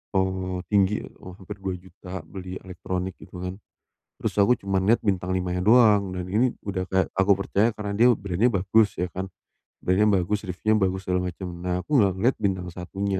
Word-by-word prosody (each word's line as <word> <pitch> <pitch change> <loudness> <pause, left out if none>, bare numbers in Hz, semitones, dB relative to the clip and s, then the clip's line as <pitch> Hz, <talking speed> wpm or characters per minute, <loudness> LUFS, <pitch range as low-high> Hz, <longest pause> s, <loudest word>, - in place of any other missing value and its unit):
Oh, 95 -1 -1
tinggi. 100 0 +3 0.2
Oh, 90 -1 -10
hampir 100 +1 -9
Rp2.000.000 95 -1 -7
beli 90 +2 -8
elektronik, 90 0 -5
gitu 90 - -13
kan. 90 +2 -5 0.6
Terus - - -2
aku 105 +4 +4
cuma 95 -1 0
lihat 110 +5 +4
bintang 95 -3 -1
5 90 -1 -1
nya 90 - -1
doang, 105 -3 +5
dan 90 -1 -4
ini, 115 +7 +2 0.2
udah 95 -2 -1
kayak 95 0 +2
aku 95 +1 +3
percaya 100 +3 +2
karena 105 -2 -5
dia 115 +4 +5
brand-nya 100 +2 +1
bagus, 100 +1 +2
ya 90 - 0
kan. 95 0 -4 0.5
Brand-nya 95 +4 +3 0.2
bagus, 105 +2 -2
reviewnya 110 +4 +1
bagus, 95 +1 -4
segala 90 0 0
macem. 90 +1 -7
Nah, 90 0 -2
aku 145 -4 +2
enggak 100 -3 +4
ngelihat 115 +8 +2
bintang 95 -3 -1
1-nya, 95 +2 -3
95 Hz, 185 wpm, -25 LUFS, 90-105 Hz, 0.6 s, doang